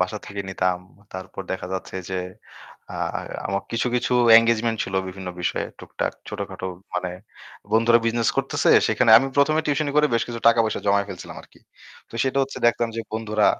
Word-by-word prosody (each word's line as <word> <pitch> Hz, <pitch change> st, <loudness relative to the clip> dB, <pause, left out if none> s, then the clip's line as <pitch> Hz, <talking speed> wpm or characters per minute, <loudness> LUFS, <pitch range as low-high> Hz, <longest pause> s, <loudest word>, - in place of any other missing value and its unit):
বাসা 95 Hz, +4 st, -1 dB
থেকে 100 Hz, 0 st, -5 dB
নিতাম। 90 Hz, -1 st, 0 dB, 0.3 s
তারপর 95 Hz, +1 st, -7 dB
দেখা 95 Hz, -1 st, -4 dB
যাচ্ছে 95 Hz, 0 st, -5 dB
যে 95 Hz, -, -2 dB, 0.8 s
আ -, -, -7 dB, 0.5 s
আমার 100 Hz, +1 st, -2 dB
কিছু, 115 Hz, +2 st, 0 dB
কিছু 125 Hz, 0 st, 0 dB, 0.3 s
এনগেজমেন্ট 115 Hz, 0 st, +1 dB
ছিল 95 Hz, -, -7 dB
বিভিন্ন 95 Hz, 0 st, -7 dB
বিষয়ে 90 Hz, -, -1 dB
টুকটাক -, -, -3 dB, 0.2 s
ছোটখাটো 95 Hz, -, -5 dB, 0.3 s
মানে 90 Hz, 0 st, -2 dB, 0.6 s
বন্ধুরা 115 Hz, +1 st, +5 dB
বিজনেস 115 Hz, 0 st, +1 dB
করতেছে। -, -, 0 dB, 0.2 s
সেখানে 125 Hz, -3 st, +3 dB
আমি 135 Hz, -, -1 dB
১ম 140 Hz, +2 st, +4 dB
এ -, -, -10 dB
টিউশনি 145 Hz, 0 st, 0 dB
করে 150 Hz, 0 st, +5 dB
বেশ 115 Hz, -, +2 dB
কিছু 115 Hz, -1 st, -5 dB
টাকা-পয়সা 115 Hz, -1 st, +2 dB
জমায় 100 Hz, 0 st, +3 dB
ফেলছিলাম 95 Hz, -2 st, -8 dB
আরকি। -, -, -21 dB, 0.5 s
তো -, -, -14 dB
সেটা 135 Hz, +1 st, 0 dB
হচ্ছে 135 Hz, -, -4 dB
দেখতাম 120 Hz, 0 st, +2 dB
যে -, -, -1 dB
বন্ধুরা 110 Hz, -1 st, +1 dB
115 Hz, 170 wpm, -23 LUFS, 95-120 Hz, 0.8 s, বন্ধুরা